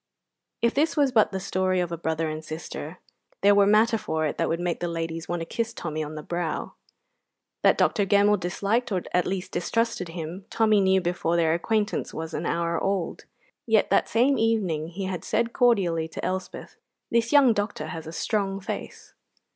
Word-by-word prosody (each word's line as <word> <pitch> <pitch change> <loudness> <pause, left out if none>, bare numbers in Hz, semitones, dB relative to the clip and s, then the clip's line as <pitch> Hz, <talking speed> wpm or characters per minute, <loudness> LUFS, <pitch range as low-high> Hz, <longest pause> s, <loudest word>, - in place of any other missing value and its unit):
If 235 - +3
this 310 +3 +1
was 280 -3 +3
but 220 -5 +4
the 190 - -3
story 185 -1 0
of 175 -1 -1
a - - -1
brother 160 0 -2
and 155 0 -5
sister, 155 +1 -7 0.4
there 205 +1 +6
were 200 0 +5
matter 220 +2 +4
for 160 -4 -1
it 150 - -3
that - - +1
would 165 - -1
make 175 -1 -2
the 175 - -2
ladies 165 -1 -4
want 175 -1 -2
to - - -3
kiss 230 +5 -3
Tommy 155 -2 -3
on 155 +1 -7
the 150 - -6
brow. 170 -1 -3 0.9
That - - +4
Dr. 205 -3 +2
Gemmell 205 0 +4
disliked 205 +7 -1
or 185 -3 0
at 180 - +2
least 185 -1 -3
distrusted 230 +2 -1
him, 170 +3 -6
Tommy 215 -2 +3
knew 190 0 +3
before 175 -1 -1
their 165 -2 +3
acquaintance 210 +5 -1
was 160 0 -5
an 160 - -2
hour 170 0 -1
old; 195 -3 -2 0.4
yet 220 -2 +3
that - - +3
same 255 +5 +3
evening 195 -9 +1
he 185 +3 -5
had 185 -2 -4
said 230 +1 0
cordially 185 -10 +2
to 160 - -6
Elspeth: 185 0 -5 0.3
"This 230 0 +2
young 280 -5 +6
doctor 205 0 -3
has 160 -1 -7
a - - -6
strong 195 +2 -1
face." 190 - -7
185 Hz, 195 wpm, -26 LUFS, 165-215 Hz, 0.9 s, there